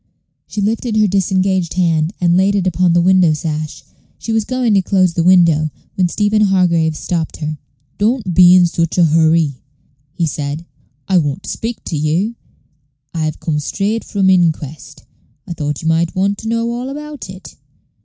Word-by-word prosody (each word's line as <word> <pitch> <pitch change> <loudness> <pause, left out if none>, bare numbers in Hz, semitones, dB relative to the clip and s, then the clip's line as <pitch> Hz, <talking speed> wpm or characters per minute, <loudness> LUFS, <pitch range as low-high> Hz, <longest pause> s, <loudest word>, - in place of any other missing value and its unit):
She 210 - -4
lifted 220 +2 -1
her 215 - +4
disengaged 190 -2 0
hand, 165 -3 +1
and 175 -1 +2
laid 195 +2 +2
it 195 -2 0
upon 180 -1 +2
the 175 - +3
window 180 -2 +4
sash; 155 -2 -4 0.3
she 225 - -4
was 220 -1 0
going 255 -3 0
to 195 - +4
close 185 -2 +1
the 170 - 0
window, 170 -4 +4 0.2
when 185 -2 +1
Stephen 210 +3 +1
Hargraves 170 -6 +2
stopped 165 -3 -3
her. 155 -1 -5 0.4
"Don't 215 -3 0
be 180 +1 +7
in 180 -1 +6
such 170 0 -1
a 175 - +5
hoorry," 160 -3 +2 0.5
he 170 - -1
said; 150 +1 -4 0.4
"I 190 -2 +3
want 145 -3 -3
to - - -5
speak 230 +1 -5
to 165 - -4
you. 160 +9 0 0.8
I've 155 -2 -3
come 150 -2 -2
straight 205 +9 -2
from 200 -2 -1
th' - - +6
inquest. 160 -5 -1 0.4
I - - -6
thought 150 -1 -4
you - - -2
might 165 +1 +1
want 195 +2 0
to 220 - -7
know 230 +1 -1
all 245 +2 -4
about 295 -5 -8
it. 185 0 -11
180 Hz, 180 wpm, -16 LUFS, 160-200 Hz, 0.8 s, be